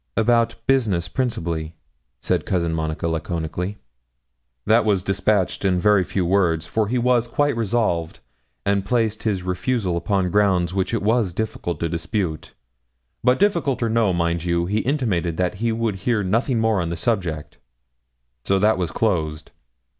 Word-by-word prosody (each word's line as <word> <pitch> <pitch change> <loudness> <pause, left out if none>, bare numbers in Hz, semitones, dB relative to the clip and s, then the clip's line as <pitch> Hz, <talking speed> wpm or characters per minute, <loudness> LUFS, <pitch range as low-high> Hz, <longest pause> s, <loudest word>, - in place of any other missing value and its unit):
'About 115 0 +3
business 110 -11 +1
principally,' 85 -8 -3 0.5
said - - 0
Cousin 85 -3 -1
Monica, 80 0 -2
laconically. 85 +4 -3 0.9
'That 110 +2 +4
was 100 -4 +1
despatched 95 0 0
in 95 -2 +2
very 105 0 +4
few 90 0 -2
words; 85 -3 +2
for 110 +5 0
he 125 +4 0
was 120 -1 +2
quite 145 +3 +1
resolved, 105 -7 0 0.5
and 100 -1 +1
placed 110 0 0
his 100 -5 -1
refusal 90 +1 -1
upon 90 +1 0
grounds 95 -4 +2
which 95 -1 -1
it 115 -4 -1
was 110 -4 +1
difficult 85 -5 -3
to 85 - +1
dispute. 85 0 -3 0.7
But 125 +1 +4
difficult 170 -11 +1
or 115 - +1
no, 110 -3 +2
mind 85 -1 0
you, 85 -1 0
he 105 +4 0
intimated 105 - -1
that 90 +2 -1
he 115 0 +1
would 110 -3 -1
hear 105 +2 0
nothing 115 +6 +1
more 110 -4 +2
on 85 - -2
the 85 - -3
subject 85 -7 -2 0.8
so 95 - +2
that 105 0 +3
was 90 -3 -1
closed.' 80 -9 -1
100 Hz, 155 wpm, -22 LUFS, 85-115 Hz, 0.9 s, That